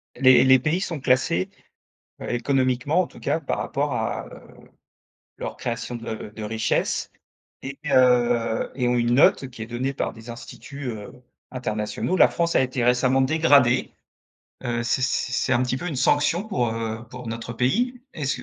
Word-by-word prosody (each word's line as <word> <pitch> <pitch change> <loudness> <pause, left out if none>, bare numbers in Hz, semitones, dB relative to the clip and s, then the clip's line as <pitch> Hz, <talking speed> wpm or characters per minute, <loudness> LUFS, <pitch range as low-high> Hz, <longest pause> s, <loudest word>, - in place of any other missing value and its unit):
Les 130 -1 +6
les 130 0 +6
pays 160 +8 0
sont 165 -6 -3
classés, 125 -9 +1 0.7
heu, - - -5
économiquement 130 +5 +1
en 180 - -3
tout - - -15
cas, - - 0
par 145 - -3
rapport 140 0 -2
à, 110 -2 -2
heu, - - -12 1.0
leur - - -5
création 115 +1 -4
de 115 -2 -6
de 110 - -7
richesse 110 +1 -1 0.5
et 135 +1 -7
heu, 120 -4 +3
et 125 -2 0
ont 125 - +2
une 120 0 +2
note 135 0 +4
qui 115 -3 -9
est - - -5
donnée 125 +4 -3
par - - -2
des 115 +1 -11
instituts, 135 +4 -9
heu, 105 -3 -8 0.4
internationaux. 110 +7 -2
La - - +6
France 170 0 0
a - - +5
été 130 -2 -1
récemment 125 +2 +3
dégradée, 140 -4 +3 0.7
heu, 120 -1 -1
c' 120 +2 0
c'est 130 -1 0
c'est 130 - +1
un 120 - +2
petit 130 +1 -1
peu 175 +5 -5
une 150 - -3
sanction 155 +8 +2
pour, 125 - 0
heu, 115 0 -4
pour 125 -1 -9
notre 115 +1 -5
pays, 240 - 0
est-ce 140 -4 -2
125 Hz, 175 wpm, -24 LUFS, 120-140 Hz, 1.0 s, Les